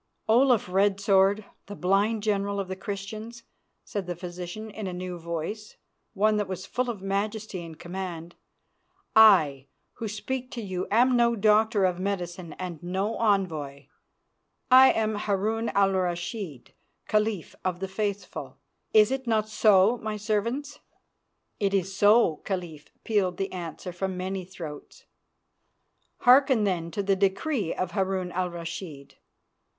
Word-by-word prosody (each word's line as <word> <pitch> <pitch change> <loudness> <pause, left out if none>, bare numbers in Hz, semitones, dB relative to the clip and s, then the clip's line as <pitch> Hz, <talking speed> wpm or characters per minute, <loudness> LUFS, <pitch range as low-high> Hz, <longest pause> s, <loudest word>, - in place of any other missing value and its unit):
"Olaf 240 -1 +4
Red 195 +2 +2
Sword, 200 +1 +3 0.2
the 205 - -7
blind 205 +4 +1
General 200 -1 0
of 195 -2 -4
the 190 - -3
Christians," 215 +4 -7 0.4
said 200 -3 -5
the 175 - -3
physician 180 +4 -7
in 210 -1 -6
a 185 - -4
new 180 0 -5
voice, 170 +6 -5 0.4
one 215 +2 +3
that 205 -2 -1
was 185 0 -5
full 250 0 -2
of 210 -5 -5
majesty 200 -1 -3
and 165 -2 -10
command, 175 -1 -6 0.8
"I 155 -11 +6 0.3
who 225 - -5
speak 250 +5 -4
to 235 - -4
you 185 -2 -3
am 245 +4 +4
no 235 -1 +3
doctor 215 -1 +3
of 180 -1 0
medicine 180 -4 -4
and 180 -4 -6
no 190 +5 -2
envoy. 155 -10 -1 0.8
I 260 +1 +9
am 220 -1 0
Harun 210 +2 -1
al 195 -1 +4
Rashid, 175 - -3 0.3
Caliph 210 -4 0
of 180 -2 -2
the 195 - -3
Faithful. 200 +1 -4 0.4
Is 215 +2 +6
it 265 -1 -3
not 215 -2 +1
so, 215 +1 +4
my 215 -1 -4
servants?" 235 +8 -2 0.8
"It 200 -2 +1
is 190 0 -1
so, 205 -5 +5
Caliph," 175 -6 -5
pealed 190 -5 0
the 195 0 -2
answer 175 0 -6
from 190 +1 -3
many 185 0 -3
throats. 165 -5 -10 1.2
"Hearken, 255 -2 +5
then, 175 -4 -1
to 200 +5 -3
the 195 0 +2
decree 200 - 0
of 185 -1 -2
Harun 190 -2 -1
al 180 0 -1
Rashid. 165 -4 -8
195 Hz, 145 wpm, -27 LUFS, 180-215 Hz, 1.2 s, I